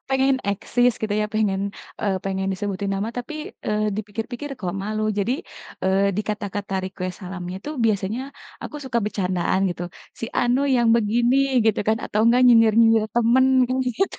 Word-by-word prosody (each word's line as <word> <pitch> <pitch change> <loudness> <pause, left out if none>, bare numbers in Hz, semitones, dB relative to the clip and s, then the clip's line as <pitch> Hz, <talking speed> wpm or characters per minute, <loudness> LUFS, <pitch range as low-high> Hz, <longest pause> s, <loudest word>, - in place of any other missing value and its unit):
pengen 265 0 +3
eksis, 245 +5 +2
gitu 215 -1 0
ya, 210 - +1
pengen, 205 -3 +1 0.4
eee, 200 -2 0
pengen 190 0 -2
disebutin 200 0 -3
nama. 200 +3 -2
Tapi, 245 +5 -5 0.3
eee, 215 0 +1
di - - 0
pikir-pikir, 235 +6 -5
"Kok 180 -2 -3
malu?" 215 +1 -2 0.2
Jadi, 215 +5 +1 0.5
eee, 195 +1 +2
di - - +1
kata-kata 205 -2 -3
request 185 -1 -5
salamnya 180 0 -6
itu, 295 - -5
biasanya 215 +1 0 0.4
aku 300 - -6
suka 235 -3 0
bercandaan 185 -3 0
gitu, 175 0 -5 0.4
"Si - - -2 0.2
anu 245 +1 +2 0.2
yang 240 -1 +3
begini," 235 +3 +2 0.3
gitu 220 -2 +2
kan, 220 - +3
atau 210 - -1
enggak, 240 +2 +5
nyindir-nyindir 225 -1 +5
teman, 240 +2 +4 0.2
kayak 255 +1 -1 0.2
gitu. 390 - 0
215 Hz, 165 wpm, -23 LUFS, 195-240 Hz, 0.5 s, enggak